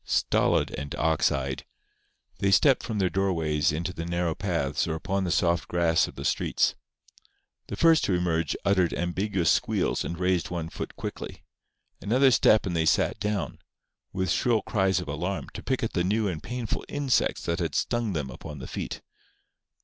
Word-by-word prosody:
Stolid - - +1
and 70 +1 -5
ox 80 0 +2
eyed, 65 -1 -3 0.8
they 100 - +2
stepped 135 +7 +5
from 110 - -4
their 95 -2 +2
doorways 80 -7 +1
into 85 +4 -3
the 85 - -5
narrow 85 -1 -1
paths 85 -7 -1
or 80 - -1
upon 95 +4 -2
the - - -1
soft 85 -1 +1
grass 85 -2 +2
of - - -11
the - - -6
streets. - - +1 0.9
The - - -5
first 165 -1 +5
to 95 - +1
emerge 85 -3 0
uttered 95 -4 +2
ambiguous 90 0 0
squeals, - - +1
and 85 - -4
raised 90 -1 +1
one 85 -2 -4
foot - - -6
quickly. - - -7 0.6
Another 130 +6 +4
step 110 -1 +4
and 90 -3 -2
they 80 -1 +1
sat - - +2
down, 105 -3 -2 0.5
with 95 -2 -1
shrill 115 +3 +2
cries 95 -4 +1
of 90 - -6
alarm, 85 +7 -3
to 105 - -7
pick 130 0 -1
at 115 - -2
the 90 - +1
new 105 +3 +1
and 80 -5 -3
painful 120 -1 -4
insects 140 -3 0
that 85 +2 -1
had 85 -4 -2
stung 120 -4 0
them 75 -5 -3
upon 75 +3 -9
the 65 - -7
feet. - - -5
90 Hz, 180 wpm, -27 LUFS, 80-100 Hz, 0.9 s, stepped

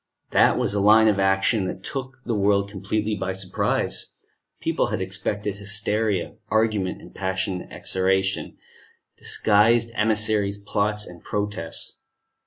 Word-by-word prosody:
That - - +4
was - - 0
a 105 - 0
line 110 +2 +6
of 105 -2 +2
action 95 +2 +2
that 95 +1 -6
took 130 +1 -5
the 120 - -1
world 100 -1 +2
completely 105 +2 -2
by 95 -2 -2
surprise. 95 -1 -1 0.5
People - - 0
had - - -2
expected 100 +2 -3
hysteria, 105 -1 +1
argument, 110 -4 0
and - - -13
passionate 95 -1 -3
exhortation; 95 0 0 0.6
disguised 115 +2 +3
emissaries, 105 -2 +1
plots, 105 +1 -1
and 85 -1 -12
protests. 100 -5 -3
100 Hz, 125 wpm, -24 LUFS, 95-110 Hz, 0.6 s, line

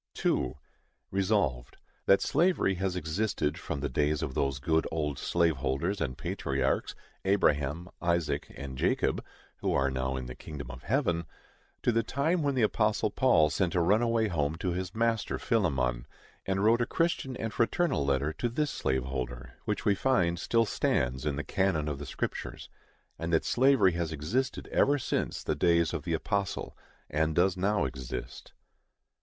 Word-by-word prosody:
2. - - 0 0.6
Resolved, 95 - 0 0.3
That 100 - +6
slavery 170 - +2
has 95 0 -2
existed 80 -1 -1
from 70 - -4
the 70 - 0
days 75 +3 0
of 70 -4 -3
those 70 0 0
good 80 +4 +1
old 75 -4 -2
slave 85 -4 +2
holders 80 +10 -1
and 65 -5 -2
patriarchs, 70 -1 -1 0.3
Abraham, 85 -4 +1
Isaac 85 -4 0
and 65 -2 -7
Jacob - - +1 0.3
(who - - -1
are 70 0 +2
now 65 0 -1
in 65 -1 -4
the 65 - -6
kingdom 70 -2 -8
of 65 0 -9
heaven), 90 - 0 0.6
to - - +3
the 115 0 +2
time 145 +9 0
when 140 -2 0
the 125 - +2
apostle 105 -1 +2
Paul 80 - +4
sent 85 +4 0
a - - +4
runaway 110 +5 +3
home 75 -5 0
to 90 +2 -2
his 90 +2 -4
master 115 -1 0
Philemon, 65 - 0 0.4
and 95 +1 0
wrote 115 +3 +4
a 120 - +1
Christian 165 -6 0
and 110 -1 -3
fraternal 115 - +1
letter 70 +2 +1
to 120 +9 -2
this 150 +5 -1
slave 65 -1 0
holder, 65 -1 -5
which - - -2
we 100 - +5
find 90 -7 +1
still 115 +5 +2
stands 65 - 0
in 70 - 0
the 75 - -3
canon 95 -6 0
of 75 -2 -3
the 75 - -6
Scriptures; - - -4 0.5
and 85 +1 -3
that 80 - +2
slavery 130 -6 +4
has 85 -1 -2
existed 105 - -2
ever 145 +1 +3
since 130 - -2
the - - 0
days 85 -2 +2
of - - -4
the - - +1
apostle, 100 -2 -2 0.3
and 80 +1 0
does 90 +1 +3
now 100 +1 +1
exist. 65 -1 -6
85 Hz, 170 wpm, -29 LUFS, 70-105 Hz, 0.6 s, That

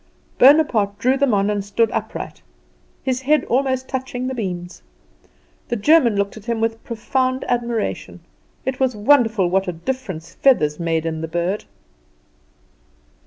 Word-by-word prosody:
Bonaparte 250 -8 +5
drew 255 +4 +2
them 275 -1 +2
on 200 -1 +2
and 205 -1 -2
stood 215 +3 +1
upright, - - -5 0.6
his 260 -1 -1
head 295 +1 +2
almost 260 0 0
touching 260 -1 -4
the 260 - -2
beams. 180 -6 -5 0.9
The 240 - -1
German 240 0 +4
looked 200 0 -1
at 215 - -12
him 235 -1 -1
with 225 0 -2
profound 255 +3 -1
admiration. 235 -2 -2 0.4
It 260 -1 -2
was 260 -3 +1
wonderful 220 -4 +3
what 190 +2 0
a - - 0
difference 185 -3 -5
feathers 155 - +2
made 165 -1 -1
in 160 -1 -3
the 160 - -3
bird. 175 +5 -2
230 Hz, 145 wpm, -20 LUFS, 195-260 Hz, 0.9 s, Bonaparte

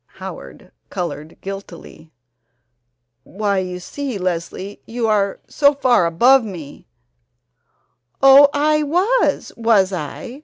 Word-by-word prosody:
Howard - - -10 0.2
colored 170 -4 -6
guiltily: 180 -5 -10 1.1
"Why, 200 - -2
you 180 -1 -5
see, 265 +5 -5
Leslie, 185 +2 -4
you 230 0 -2
are 200 -2 0
so 285 -1 +2
far 245 -10 +2
above 245 +11 +4
me 170 -9 -10 0.7
" 120 0 -48
"Oh, 275 +1 +8
I 305 +1 +1
was, 365 +12 0
was 215 -5 +2
I? 235 - -6
205 Hz, 110 wpm, -19 LUFS, 180-270 Hz, 1.1 s, Oh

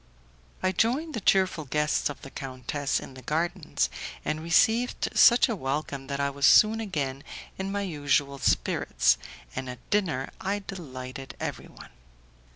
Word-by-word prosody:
I 185 - +3
joined 260 - 0
the 225 - -3
cheerful 185 -5 +2
guests 150 +3 +1
of 145 - -8
the 135 - -9
countess 135 +2 -3
in - - -10
the 130 - -11
gardens, 155 - -1 0.4
and 155 0 -1
received 220 +9 +2
such 240 0 +7
a 230 - -1
welcome 140 -3 -3
that 140 -1 -3
I 140 0 +1
was 140 0 +3
soon 220 +1 +6
again 145 -10 -3 0.4
in 190 +1 -2
my 200 0 -1
usual 145 -5 0
spirits, 60 - +2 0.4
and 130 - -4
at 125 -1 -10
dinner 165 -10 0
I 200 +1 -2
delighted 130 -7 -8
everyone. - - -7
150 Hz, 150 wpm, -27 LUFS, 135-195 Hz, 0.4 s, such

